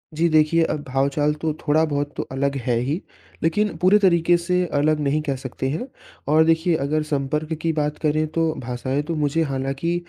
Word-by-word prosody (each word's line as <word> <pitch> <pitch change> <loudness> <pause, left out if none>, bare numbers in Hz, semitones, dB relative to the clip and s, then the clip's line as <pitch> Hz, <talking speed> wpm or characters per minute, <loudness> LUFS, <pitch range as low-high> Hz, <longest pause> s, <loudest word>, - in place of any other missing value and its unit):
जी, 170 +2 +2
देखिए, 155 +1 +3
अब 150 -2 -2
भाव-चाल 140 +3 +1
तो 160 - 0 0.2
थोड़ा 155 +2 +4
बहुत 145 -1 -2
तो - - -1
अलग 140 +1 -1
है 120 -2 +1
ही, 145 +9 -2 0.4
लेकिन 205 +4 +1
पूरे 185 +4 +5
तरीक़े 175 -3 +4
से 180 +1 0
अलग 150 +1 +2
नहीं 150 +1 0
कह 140 -3 -2
सकते 130 0 -5
हैं 165 - -3 0.4
और 155 +2 +5
देखिए, 165 +1 +2
अगर 155 +1 0
संपर्क 150 +1 -2
की 165 - +1
बात 150 0 -1
करें, 155 0 +1
तो 160 0 0
भाषाएँ 130 +3 -2
तो 165 - -2
मुझे 150 +1 0
हालाँकि 135 +4 -2
155 Hz, 190 wpm, -22 LUFS, 140-165 Hz, 0.4 s, पूरे